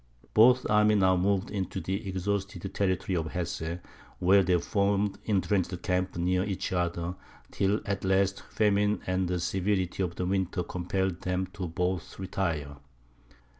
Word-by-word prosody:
Both 125 +3 +6
armies 105 0 +4
now 95 -1 +4
moved 95 +1 +1
into 95 -2 -3
the 95 +3 -3
exhausted 95 0 -3
territory 95 -1 0
of 80 -2 -2
Hesse, 85 -1 -3 0.4
where 95 +2 +5
they 90 -1 +2
formed 100 +2 0
intrenched 95 -3 0
camps 90 0 -1
near 90 +1 +1
each 95 -2 -3
other, 85 -1 -1 0.4
till 100 +2 +1
at 100 -2 -2
last 95 +1 +2
famine 105 -1 +2
and 95 0 0
the 90 0 -1
severity 95 +1 -1
of 90 -2 -1
the 90 - -2
winter 95 -1 0
compelled 90 0 -2
them 90 0 -1
both 90 -1 -3
to - - -10
retire. 80 -7 -2
95 Hz, 145 wpm, -29 LUFS, 90-100 Hz, 0.4 s, Both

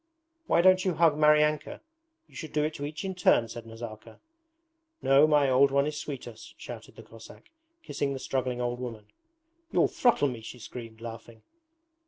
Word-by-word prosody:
'Why - - +4
don't 185 0 +5
you 185 -3 0
hug 165 -2 +4
Maryanka? 150 0 +3 0.5
You - - -26
should 160 - -8
do 150 - +1
it 155 +1 -1
to 145 - -5
each 155 +4 -6
in 190 - -3
turn,' 150 -10 +3
said 115 +1 -9
Nazarka. 115 -1 -10 0.8
'No, 135 +3 +5
my 150 -2 +4
old 135 +2 +5
one 140 +1 +2
is 150 0 -3
sweeter,' 135 -5 -6
shouted - - -11
the - - -12
Cossack, 115 - -15 0.3
kissing 140 - -2
the 135 - -3
struggling 130 -2 -2
old 120 0 -2
woman. 115 -4 -7 0.7
'You'll - - +3
throttle 240 - +2
me,' 120 -3 -7
she 110 +3 -9
screamed, 115 -1 -10
laughing. 115 -1 -10
135 Hz, 175 wpm, -28 LUFS, 115-150 Hz, 0.8 s, don't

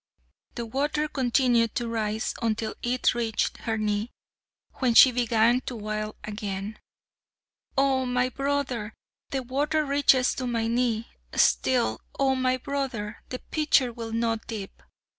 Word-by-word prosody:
The 235 - -3
water 295 +6 -1
continued 245 -4 +2
to 240 -2 -1
rise 220 -1 -2
until 220 -1 -1
it 245 +1 +1
reached 230 -3 -1
her 225 -1 -2
knee, 210 +1 -1 0.7
when 250 -4 +2
she 260 - +9
began 235 0 +3
to 250 - -3
wail 215 0 -4
again: 205 0 -5 1.0
"Oh! 265 -1 +2
my 250 0 +1
brother, 265 -5 -2 0.3
the 270 -1 -2
water 295 +5 0
reaches 275 -2 +3
to 255 - -4
my 230 -2 0
knee, 230 -1 0 0.3
Still, 250 -2 +2 0.2
Oh! 270 -1 +3
my 255 0 +1
brother, 255 -6 -4
the 255 - -3
pitcher 290 -5 +2
will 230 -1 -6
not 225 -1 -1
dip." 210 -4 -7
240 Hz, 135 wpm, -26 LUFS, 225-260 Hz, 1.0 s, she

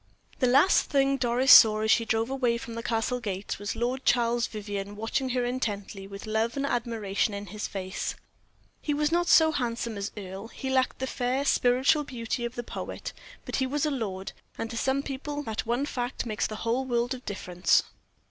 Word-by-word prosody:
The 255 - +3
last 275 +9 +5
thing 275 -1 +3
Doris 250 +1 +3
saw, 215 -2 +9
as 220 0 +2
she 230 - +4
drove 225 +3 0
away 250 -3 +1
from 235 0 -8
the 230 - -4
Castle 230 +2 -1
gates, 200 -4 -4
was 205 0 -3
Lord 250 +3 -2
Charles 235 -1 +2
Vivianne 205 -1 -5
watching 225 +5 -1
her 250 -1 0
intently, 205 -5 -3
with 200 +1 -8
love 220 +3 0
and 275 - 0
admiration 225 -5 -1
in 200 0 -5
his 210 - -3
face. 190 -1 -4 0.7
He 295 - -1
was 300 +1 +1
not 345 +1 +2
so 320 -1 +6
handsome 235 -5 -2
as 200 +2 -3
Earle; 195 +1 -7
he 265 +3 -5
lacked 260 -1 +1
the 265 - -2
fair, 255 +1 -1
spiritual 265 +4 +3
beauty 240 -3 -3
of 235 +1 -5
the 240 - -4
poet; - - -6 0.3
but - - -2
he 260 - +1
was 290 +3 0
a 300 - 0
lord, 195 -8 -3 0.3
and, 225 - -4
to - - -5
some 265 +4 0
people, 290 +2 -4
that 220 -3 -4
one 240 +4 +1
fact 250 -3 -3
makes 215 -3 -1
the 215 - -6
whole 240 +3 +1
world 245 0 0
of 255 -1 -8
difference. 180 -4 +1
235 Hz, 200 wpm, -28 LUFS, 215-265 Hz, 0.7 s, saw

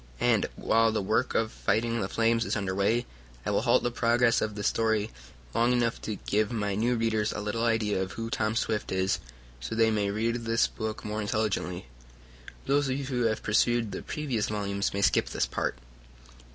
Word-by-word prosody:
And, - - +3
while 115 0 +3
the 110 - 0
work 110 - 0
of 110 0 +1
fighting 115 +3 0
the 95 - -2
flames 115 0 +2
is - - -1
under 100 -3 -1
way, 110 +5 +1 0.4
I - - 0
will - - +2
halt - - +3
the 120 - 0
progress 120 0 +3
of 110 -1 -2
this 105 -1 -4
story 110 -1 +1 0.4
long 120 +2 +3
enough 120 -1 0
to 110 - -3
give 105 +2 0
my 105 -3 -1
new 115 +5 +1
readers 110 -2 +1
a - - -4
little 105 +2 -2
idea 110 -4 +1
of 95 - -4
who 115 0 -5
Tom 110 0 0
Swift 110 -2 -1
is, 95 0 +1 0.4
so 85 - -5
they 110 0 +4
may 105 -2 +1
read 115 +3 0
this 115 -1 +1
book 110 -1 -5
more 105 +1 -2
intelligently. 105 -4 -1 0.8
Those 140 0 +2
of 130 - 0
you 140 - -4
who 130 -2 -2
have 110 -1 0
perused 115 +1 +2
the - - -5
previous 135 -8 -2
volumes 100 -1 -1
may 100 0 -1
skip - - +3
this - - 0
part. - - -2
110 Hz, 200 wpm, -28 LUFS, 105-115 Hz, 0.8 s, they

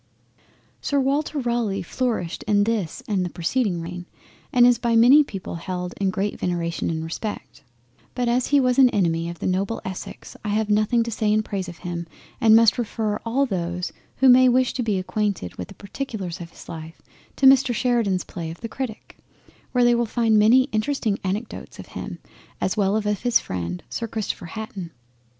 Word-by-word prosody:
Sir 285 - +1
Walter 285 +3 0
Raleigh 235 -7 -1
flourished 220 -4 -2
in 205 -1 +4
this 210 -7 -2
and 195 -4 0
the 180 - -2
preceeding 180 +1 -1
reign, 175 +1 -7 0.4
and 245 -1 +6
is 245 -1 +5
by 235 -1 +1
many 255 +6 +7
people 195 -9 -6
held 180 +1 -4
in 195 - +2
great 195 +2 -2
veneration 170 -1 -1
and 160 -1 -2
respect—But 130 - -7
as 245 +1 +1
he 285 - +4
was 255 -1 +2
an 260 -2 +8
enemy 170 -5 0
of 170 - -7
the - - -6
noble 195 +4 0
Essex, 190 -1 -7
I 210 - -3
have 210 0 0
nothing 215 +3 +3
to 230 - -5
say 215 -1 0
in 215 +1 +2
praise 195 -3 -4
of 170 - -10
him, 170 -1 -4 0.3
and 220 -1 +7
must 230 +2 +5
refer 215 -2 -1
all 265 +5 +2
those 180 -5 -3 0.2
who 265 - +3
may 255 0 +7
wish 255 +1 +2
to 255 - -2
be 215 -4 0
acquainted 190 - -2
with 90 - -5
the - - -13
particulars 200 -5 -5
of 170 - -7
his - - -14
life, 160 0 -8 0.4
to 275 - +1
Mr 265 -1 +6
Sheridan's 230 -6 +1
play 165 -2 -6
of 165 - -9
the 230 - -4
Critic, 245 -2 -6 0.5
where 250 -1 +3
they 240 0 +5
will 235 0 +1
find 225 -1 +3
many 235 +5 +6
interesting 215 -2 0
anecdotes 205 +4 -4 0.8
as 190 - 0
well 200 -1 +2
of 220 - 0
him 210 - +2
as 205 - -1
of - - -19
his 245 -1 +4
friend 90 -1 -5
Sir 230 - -4
Christopher 215 -5 -4
Hatton. 200 -3 -6
210 Hz, 190 wpm, -23 LUFS, 180-240 Hz, 0.8 s, an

